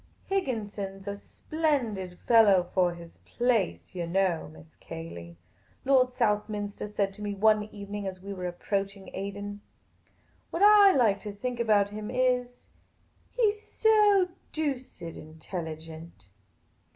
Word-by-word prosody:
" - - -34
Higginson 210 - -2
's - - -20
a 200 - -2
splendid 225 - -2
fellow 210 -6 +6
for 180 -2 +2
his 170 -1 -13
place, 235 -8 -1
yah 175 -2 -3
know. 175 - 0
Miss 80 0 -16
Cayley," 85 +1 -9 0.5
Lord 255 -2 +4
Southminster 210 -3 -1
said 200 -1 -1
to 210 - -12
me 205 -1 -3
one 215 +1 +3
ev^ening 205 -1 -6
as 185 -1 -6
we 200 0 -5
were 180 -2 -4
approaching 195 +2 -3
Aden. 200 +1 -5 0.4
" - - -37
What 340 - -1
I 410 -1 +8
like 215 -7 +3 0.4
about 210 -3 +3
him 210 +1 -6
is, 250 0 0 0.6
he 460 -4 +2
's 420 0 -14
so 420 -5 +4 0.2
doosid 260 - -4
intelligent." 160 - -8
205 Hz, 130 wpm, -28 LUFS, 185-250 Hz, 0.6 s, I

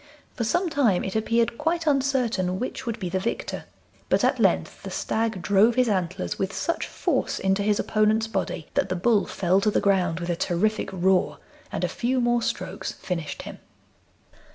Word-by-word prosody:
For 235 - -3
some 350 - +1
time 270 - +2
it 190 - -4
appeared 230 +1 +1
quite 330 +2 0
uncertain 255 - +1
which 260 0 -4
would 230 0 -2
be 185 - -3
the 185 +2 -1
victor, 215 +5 -3 0.4
but - - +2
at - - +2
length - - +1
the - - -7
stag 220 -5 -2
drove 210 +4 +4
his 255 -1 +3
antlers 185 -2 -1
with 190 0 -1
such 335 - -2
force - - -1
into 190 +1 +1
his 205 0 +1
opponent's 215 +1 +2
body 195 -7 -3
that 190 - +1
the 185 - 0
bull 205 +3 +2
fell 185 +1 +1
to 210 - +3
the - - +2
ground 180 -4 +2
with 175 0 -2
a - - 0
terrific 210 +6 0
roar, 185 0 +2 0.3
and - - -3
a - - +3
few 255 +2 -1
more 240 -1 +2
strokes - - -3
finished 170 -5 -5
him. - - -9
215 Hz, 185 wpm, -25 LUFS, 185-240 Hz, 0.4 s, drove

